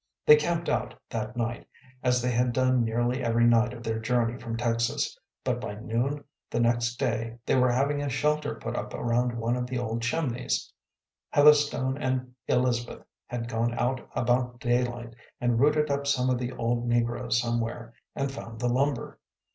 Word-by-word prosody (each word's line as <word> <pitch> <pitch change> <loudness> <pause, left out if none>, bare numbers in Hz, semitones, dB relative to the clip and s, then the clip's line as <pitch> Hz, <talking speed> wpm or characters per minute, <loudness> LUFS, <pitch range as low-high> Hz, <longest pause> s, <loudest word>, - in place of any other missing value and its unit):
They 150 - +10
camped 170 +3 -1
out - - -1 0.2
that 125 - -4
night, 120 0 -3 0.3
as 125 -1 +2
they 125 - +1
had 120 +1 +1
done 130 -1 +3
nearly 120 +3 0
every 120 0 +3
night 120 0 +4
of 120 -1 -9
their 115 -1 -1
journey 115 0 +1
from 115 -2 -5
Texas, 115 0 0 0.3
but - - -1
by 105 - -5
noon 120 +7 -2 0.3
the - - -1
next 120 0 +2
day 115 -3 -2
they - - +1
were 125 -1 +4
having 140 +3 +1
a 145 - -1
shelter 150 +3 0
put - - -5
up - - -4
around 120 0 0
one 115 +1 0
of 125 0 -2
the 125 0 -3
old 115 -1 -2
chimneys. 125 0 -1 0.6
Heatherstone 145 -2 +4
and 130 -2 -2
Elizabeth 125 -1 0 0.2
had 120 -1 -4
gone 120 0 -1
out 125 +1 0
about 125 0 +1
daylight 120 -1 -1 0.2
and 120 -2 +1
rooted 150 +2 +3
up 140 0 -1
some 130 -2 +2
of 125 - +1
the 125 0 -3
old 120 0 -1
negroes 120 0 +1
somewhere, 115 0 -2 0.2
and 140 -1 -1
found 115 -4 -8
the 120 0 0
lumber. 135 0 -1
120 Hz, 175 wpm, -27 LUFS, 115-130 Hz, 0.6 s, They